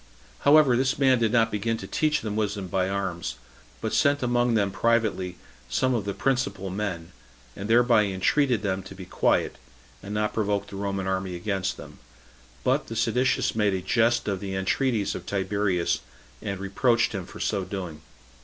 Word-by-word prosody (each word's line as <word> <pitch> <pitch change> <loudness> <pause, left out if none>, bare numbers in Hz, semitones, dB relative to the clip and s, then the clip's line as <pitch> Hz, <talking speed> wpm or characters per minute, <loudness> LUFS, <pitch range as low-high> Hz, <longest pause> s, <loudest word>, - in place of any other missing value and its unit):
However, 145 -3 +6
this 130 +2 +1
man 130 -3 +4
did 115 -2 +2
not 115 -1 +3
begin 110 +2 -1
to - - -7
teach 155 -1 +1
them 105 -2 -4
wisdom 105 -2 -1
by 95 0 0
arms, 95 -3 -3 0.5
but - - -2
sent 145 -1 +3
among 120 -1 +2
them 100 -3 +2
privately 110 -6 0 0.3
some 130 - +1
of 110 -5 -1
the 100 - -3
principal 100 -8 -1
men, 90 -4 -4 0.4
and 100 +2 -6
thereby 115 -2 +5
entreated 110 +6 +1
them 95 -2 -1
to 95 - -11
be 95 -1 -9
quiet, - - +1 0.4
and 100 - -8
not 105 0 0
provoke 100 -2 0
the 100 - -10
Roman 100 -1 -2
army 95 -1 -2
against 95 +1 -2
them; - - -12 0.6
but - - +1
the 115 - -6
seditious 125 +3 +1
made 105 -3 +1
a 95 - -2
jest 115 +4 +2
of 100 -2 -1
the 95 -1 -4
entreaties 105 +3 0
of 90 - -7
Tiberius, 95 -2 0 0.4
and 100 -2 -4
reproached 115 +4 +2
him 95 -4 -5
for - - -11
so 100 -3 0
doing. 90 -5 -6
105 Hz, 175 wpm, -26 LUFS, 95-115 Hz, 0.6 s, However